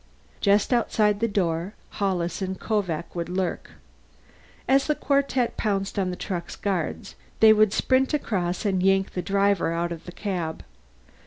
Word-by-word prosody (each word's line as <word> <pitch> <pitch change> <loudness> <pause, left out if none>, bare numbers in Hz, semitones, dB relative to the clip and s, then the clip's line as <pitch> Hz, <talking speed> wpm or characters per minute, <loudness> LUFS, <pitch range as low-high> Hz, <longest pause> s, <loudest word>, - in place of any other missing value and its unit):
Just 205 +4 +3
outside 210 -3 +2
the 230 - +1
door, 180 -2 -1 0.2
Hollis 185 -3 -1
and 190 -1 -3
Kovak 180 -7 -2
would 170 0 -3
lurk. 185 0 -3 0.9
As 270 +1 +3
the 300 - +2
quartet 275 -4 0
pounced 200 -2 -1
on 185 -1 0
the 180 - -3
truck's 175 -2 -5
guards, 185 -6 -3 0.3
they 220 -1 +8
would 215 -1 +4
sprint 260 +4 +2
across 190 - -1
and 190 -3 +1
yank 195 +1 +2
the 180 - -3
driver 200 -2 +1
out 170 +1 -1
of 165 -1 -7
the 180 - -8
cab. 175 -5 -4
195 Hz, 155 wpm, -25 LUFS, 175-215 Hz, 0.9 s, they